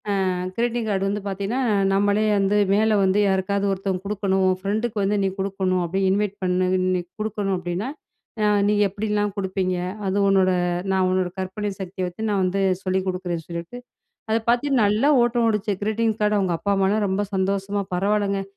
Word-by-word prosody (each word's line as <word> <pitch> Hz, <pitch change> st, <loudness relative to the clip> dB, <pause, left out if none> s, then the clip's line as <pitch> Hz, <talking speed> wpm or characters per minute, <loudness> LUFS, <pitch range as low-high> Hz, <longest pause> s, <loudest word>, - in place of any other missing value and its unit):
அ, -, -, +1 dB, 0.4 s
greeting 240 Hz, 0 st, -1 dB
card 195 Hz, -2 st, 0 dB
வந்து 205 Hz, +1 st, -2 dB
பாத்தீங்கன்னா, 200 Hz, +5 st, -2 dB, 0.3 s
நம்மளே 205 Hz, +2 st, +2 dB
வந்து 200 Hz, +1 st, +2 dB, 0.2 s
மேல 215 Hz, +2 st, +3 dB
வந்து 190 Hz, +1 st, +3 dB
யாருக்காவது 195 Hz, +1 st, 0 dB
ஒருத்தவங்க 190 Hz, -1 st, -2 dB
குடுக்கணும். 195 Hz, -2 st, 0 dB
உன் 185 Hz, 0 st, +2 dB
ஃபிரெண்டுக்கு 215 Hz, +3 st, -2 dB
வந்து, 200 Hz, +2 st, +1 dB
நீ -, -, +2 dB
குடுக்கணும் 190 Hz, -1 st, 0 dB
அப்பிடி 175 Hz, +3 st, -2 dB
இன்வைட் 200 Hz, 0 st, 0 dB
பண்ண 185 Hz, 0 st, +1 dB
இன்னிக்கு 185 Hz, -1 st, -1 dB
குடுக்கணும் 210 Hz, -2 st, -1 dB
அப்பிடின்னா, 180 Hz, +6 st, -3 dB, 0.5 s
ஆ, -, -, +4 dB, 0.2 s
நீ 210 Hz, -, +3 dB
எப்பிடிலாம் 205 Hz, +1 st, -2 dB
குடுப்பீங்க? 190 Hz, -1 st, -1 dB, 0.3 s
அது 190 Hz, +1 st, 0 dB
உன்னோட 190 Hz, -1 st, +4 dB, 0.4 s
நான் 190 Hz, -1 st, +2 dB
உன்னோட 185 Hz, -1 st, +1 dB
கற்பனை 195 Hz, +2 st, -3 dB
சக்திய 185 Hz, 0 st, -4 dB
வச்சி, 180 Hz, +4 st, -9 dB
நான் 200 Hz, -2 st, +1 dB
வந்து 185 Hz, +2 st, 0 dB, 0.2 s
சொல்லி 190 Hz, 0 st, 0 dB
குடுக்கிறேன்னு 180 Hz, -3 st, -3 dB
சொல்லிட்டு, 170 Hz, +7 st, -6 dB, 0.5 s
அத 220 Hz, -, +3 dB
பார்த்தீங்கன்னா, 245 Hz, 0 st, +3 dB
நல்ல 210 Hz, +5 st, +1 dB, 0.2 s
ஓட்டம் 240 Hz, -1 st, +2 dB
ஓடிச்சு, 210 Hz, -1 st, 0 dB
கிரீட்டிங் 220 Hz, +1 st, 0 dB
கார்டு. 210 Hz, 0 st, +2 dB
அவுங்க 185 Hz, -3 st, 0 dB
அம்மா, 200 Hz, +2 st, 0 dB
அப்பா 195 Hz, 0 st, +2 dB
எல்லாம் 210 Hz, +1 st, +1 dB
ரொம்ப 190 Hz, +2 st, 0 dB
சந்தோஷமா, 195 Hz, +1 st, -1 dB
பரவால்லங்க, 200 Hz, +1 st, 0 dB
195 Hz, 170 wpm, -23 LUFS, 185-210 Hz, 0.5 s, ஆ